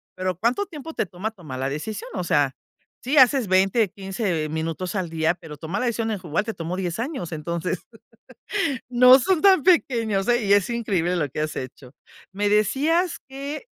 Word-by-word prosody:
Pero, 185 Hz, -2 st, -2 dB
¿cuánto 240 Hz, -, 0 dB
tiempo 325 Hz, -3 st, -9 dB
te -, -, -1 dB
toma 190 Hz, +5 st, -5 dB
tomar 160 Hz, -11 st, -9 dB
la 135 Hz, +1 st, -1 dB
decisión? 180 Hz, +9 st, -5 dB
O 180 Hz, -, -2 dB
sea, 145 Hz, -5 st, +2 dB, 0.5 s
sí, 265 Hz, +5 st, -1 dB
haces 260 Hz, -3 st, +6 dB
20, 195 Hz, +4 st, +3 dB
15 190 Hz, -5 st, -2 dB
minutos 165 Hz, +4 st, -3 dB
al 185 Hz, -4 st, -2 dB
día, 160 Hz, +1 st, +1 dB
pero 165 Hz, -4 st, -10 dB
tomar 165 Hz, +6 st, -4 dB
la -, -, 0 dB
decisión 225 Hz, -1 st, -1 dB
hijo 190 Hz, -4 st, -5 dB
igual 160 Hz, +7 st, 0 dB
te 225 Hz, -, -3 dB
tomó 170 Hz, 0 st, -4 dB
10 180 Hz, +1 st, -3 dB
años. 235 Hz, -, -4 dB
Entonces, 170 Hz, +3 st, -3 dB, 1.1 s
no 250 Hz, +1 st, +8 dB
son 330 Hz, +6 st, +1 dB
tan 380 Hz, -7 st, +6 dB
pequeños, 230 Hz, -, +2 dB
eh, 240 Hz, -1 st, +2 dB
y 200 Hz, -, +3 dB
es 205 Hz, 0 st, +4 dB
increíble 190 Hz, -7 st, 0 dB
lo 150 Hz, -5 st, -1 dB
que 145 Hz, -, -4 dB
has 155 Hz, 0 st, -3 dB
hecho. 130 Hz, 0 st, -8 dB, 0.4 s
Me 205 Hz, +1 st, 0 dB
decías 305 Hz, -, +2 dB
que 275 Hz, +3 st, -6 dB
195 Hz, 185 wpm, -23 LUFS, 170-245 Hz, 1.1 s, no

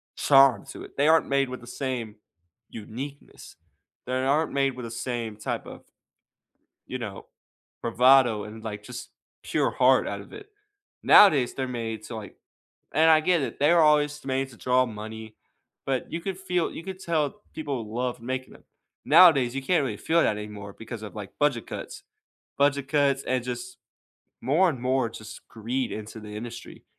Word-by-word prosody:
charm 135 Hz, -2 st, +5 dB
to -, -, -9 dB
it. -, -, -13 dB
They 145 Hz, +2 st, +3 dB
aren't 160 Hz, 0 st, +4 dB
made 140 Hz, -1 st, +1 dB
with 130 Hz, -, -6 dB
the 120 Hz, -, -13 dB
same 125 Hz, -6 st, -4 dB, 0.5 s
uniqueness. 130 Hz, +6 st, -9 dB, 0.5 s
They 125 Hz, -, -4 dB
aren't 135 Hz, +5 st, +1 dB
made 135 Hz, -1 st, +2 dB
with 125 Hz, -2 st, -7 dB
the 115 Hz, -, -7 dB
same 120 Hz, -2 st, -4 dB
type 105 Hz, -, -4 dB
of, -, -, -11 dB, 1.0 s
you 130 Hz, -, -5 dB
know, 105 Hz, -5 st, -7 dB, 0.6 s
bravado, 120 Hz, -2 st, +4 dB
and, 110 Hz, +1 st, -10 dB
like, 105 Hz, -2 st, -6 dB
just 125 Hz, +1 st, -8 dB, 0.3 s
pure -, -, 0 dB
heart -, -, +4 dB
out -, -, -4 dB
of -, -, -14 dB
it. 420 Hz, 0 st, -11 dB, 0.5 s
Nowadays, 150 Hz, -12 st, +6 dB
they're 130 Hz, -, -2 dB
made 115 Hz, -3 st, -4 dB
to, -, -, -8 dB
like 105 Hz, -3 st, -9 dB, 0.6 s
And 160 Hz, +1 st, +5 dB
I 155 Hz, -1 st, +6 dB
get 175 Hz, 0 st, +2 dB
it, 135 Hz, -, -4 dB
they're 165 Hz, +3 st, +5 dB
all 150 Hz, -1 st, +6 dB
just 150 Hz, 0 st, -6 dB
made 135 Hz, 0 st, -1 dB
to 115 Hz, -, -14 dB
draw 130 Hz, 0 st, +2 dB
money, 110 Hz, 0 st, -8 dB, 0.5 s
but 135 Hz, -2 st, -2 dB
you 165 Hz, +1 st, -3 dB
could 190 Hz, 0 st, -4 dB
feel 180 Hz, -3 st, -1 dB
you 165 Hz, -, -8 dB
could 190 Hz, 0 st, -7 dB
tell 170 Hz, +2 st, -1 dB
people 135 Hz, -8 st, -4 dB
love 125 Hz, +1 st, -3 dB
making 130 Hz, +1 st, -4 dB
them. -, -, -19 dB, 0.4 s
Nowadays, 140 Hz, -9 st, +6 dB
you 135 Hz, -, -2 dB
can't 160 Hz, +1 st, +2 dB
really 110 Hz, -6 st, -3 dB
feel 165 Hz, +1 st, +2 dB
that 105 Hz, -, +1 dB
anymore 105 Hz, -1 st, -8 dB
because 115 Hz, 0 st, -8 dB
of, 105 Hz, -, -9 dB
like, 105 Hz, -3 st, -8 dB
budget 145 Hz, -6 st, +1 dB
cuts. -, -, -7 dB, 0.6 s
Budget 140 Hz, -1 st, +2 dB
cuts, 140 Hz, -2 st, +2 dB
and 125 Hz, -1 st, -1 dB
just 125 Hz, 0 st, -6 dB, 0.6 s
more 155 Hz, +10 st, +3 dB
and 130 Hz, -5 st, -6 dB
more 130 Hz, -1 st, +1 dB
just 110 Hz, -1 st, -11 dB
greed 120 Hz, +3 st, -3 dB
into 110 Hz, +1 st, -7 dB
the 105 Hz, 0 st, -10 dB
industry. 120 Hz, +2 st, -9 dB
130 Hz, 180 wpm, -26 LUFS, 115-145 Hz, 1.0 s, Nowadays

